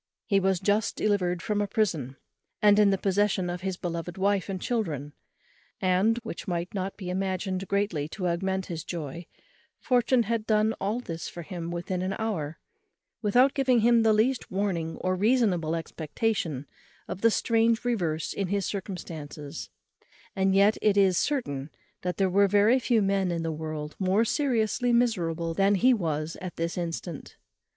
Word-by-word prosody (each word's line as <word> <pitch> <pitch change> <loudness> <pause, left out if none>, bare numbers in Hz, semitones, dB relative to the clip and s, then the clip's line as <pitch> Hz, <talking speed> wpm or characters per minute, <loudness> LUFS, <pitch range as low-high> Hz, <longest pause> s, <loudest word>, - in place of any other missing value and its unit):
He 200 -3 +3
was 190 -1 +1
just 205 +3 +1
delivered 180 -5 0
from 210 -1 0
a 205 - 0
prison, 175 - -1 0.4
and 205 0 +5
in 210 -1 +6
the 195 - +2
possession 195 -2 +1
of 175 0 -5
his 190 -1 -3
beloved 170 -1 -4
wife 200 0 +1
and 190 -1 -3
children; 160 - -2 0.7
and 190 +5 +2
(which 225 - -7
might 175 0 -2 0.3
be 180 -3 -5
imagined 190 0 -2
greatly 200 -7 0
to 180 +3 -3
augment 190 +2 -1
his 165 -2 -5
joy) 165 0 -6 0.5
fortune 250 0 +3
had 225 0 -2
done 215 0 +3
all 210 +5 -1
this 165 -8 -6
for 170 - -8
him 170 -1 -6
within 175 +1 -3
an 190 +1 -2
hour, 170 -9 -3 0.6
without 245 +6 +4
giving 260 -4 +3
him 235 +1 +5
the 225 -1 +4
least 225 +4 +1
warning 185 -4 -2
or 185 - +1
reasonable 190 -6 +2
expectation 165 - -2 0.4
of 185 - -6
the 230 - +6
strange 230 +1 +2
reverse 170 -10 -1
in 195 - -2
his 200 +1 -1
circumstances; 160 -7 -6 0.7
and 190 0 +2
yet 200 +2 +4
it 210 -2 +3
is 190 -2 +5
certain 155 - -1 0.3
that 180 0 -3
there 195 - +3
were 200 +2 +4
very 205 +6 +4
few 235 -4 +2
men 195 -1 +1
in 170 -1 -2
the 165 - -1
world 155 -1 -5
more 195 +4 +2
seriously 245 -2 +1
miserable 175 -9 +1
than 195 +3 +3
he 250 +7 +5
was 160 -6 -2
at 185 -1 -6
this 165 0 -2
instant. 170 -2 -5
190 Hz, 165 wpm, -27 LUFS, 170-215 Hz, 0.7 s, in